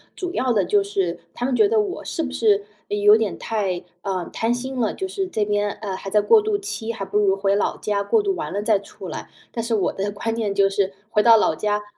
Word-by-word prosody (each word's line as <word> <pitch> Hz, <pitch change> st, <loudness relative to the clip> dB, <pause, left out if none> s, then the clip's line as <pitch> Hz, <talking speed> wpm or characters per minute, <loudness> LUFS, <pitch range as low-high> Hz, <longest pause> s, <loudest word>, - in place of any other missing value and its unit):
主 360 Hz, -2 st, -4 dB
要 255 Hz, -1 st, +1 dB
的 200 Hz, -5 st, +2 dB
就 205 Hz, +2 st, +3 dB
是 195 Hz, -4 st, -2 dB, 0.2 s
他 245 Hz, -, -2 dB
们 260 Hz, -, 0 dB
觉 410 Hz, -, +5 dB
得 445 Hz, -1 st, +3 dB
我 395 Hz, -3 st, -2 dB
是 325 Hz, -, -3 dB
不 265 Hz, -, -4 dB
是 210 Hz, -6 st, +2 dB, 0.2 s
有 205 Hz, +1 st, +5 dB
点 220 Hz, -2 st, -1 dB
太， 195 Hz, -5 st, -2 dB, 0.2 s
呃， 185 Hz, -3 st, -3 dB
贪 225 Hz, +1 st, 0 dB
心 260 Hz, +1 st, -4 dB
了， 220 Hz, -, +1 dB
就 380 Hz, -, -4 dB
是 385 Hz, 0 st, -3 dB
这 215 Hz, -, -1 dB
边， 205 Hz, 0 st, 0 dB
呃， 200 Hz, -2 st, -5 dB
还 195 Hz, +1 st, -6 dB
在 210 Hz, -, +3 dB
过 440 Hz, -, +5 dB
渡 425 Hz, -1 st, 0 dB
期， 255 Hz, -, -4 dB
还 210 Hz, -4 st, -5 dB
不 195 Hz, +2 st, -2 dB
如 195 Hz, -2 st, +3 dB
回 195 Hz, 0 st, +1 dB
老 205 Hz, -, 0 dB
家 205 Hz, -1 st, -1 dB
过 430 Hz, -, +3 dB
渡 395 Hz, -1 st, 0 dB
完 325 Hz, -, -4 dB
了 200 Hz, -, -2 dB
再 215 Hz, 0 st, +3 dB
出 200 Hz, -, -11 dB
来。 -, -, -7 dB, 0.2 s
但 230 Hz, -, -2 dB
是 230 Hz, 0 st, -1 dB
我 200 Hz, -, 0 dB
的 200 Hz, +1 st, -2 dB
观 225 Hz, +2 st, -3 dB
念 215 Hz, -3 st, -1 dB
就 200 Hz, 0 st, +4 dB
是 195 Hz, 0 st, 0 dB, 0.2 s
回 210 Hz, -, +4 dB
到 230 Hz, -1 st, +8 dB
老 160 Hz, -, +2 dB
家， 210 Hz, +3 st, -1 dB
210 Hz, 275 characters per minute, -22 LUFS, 200-250 Hz, 0.2 s, 到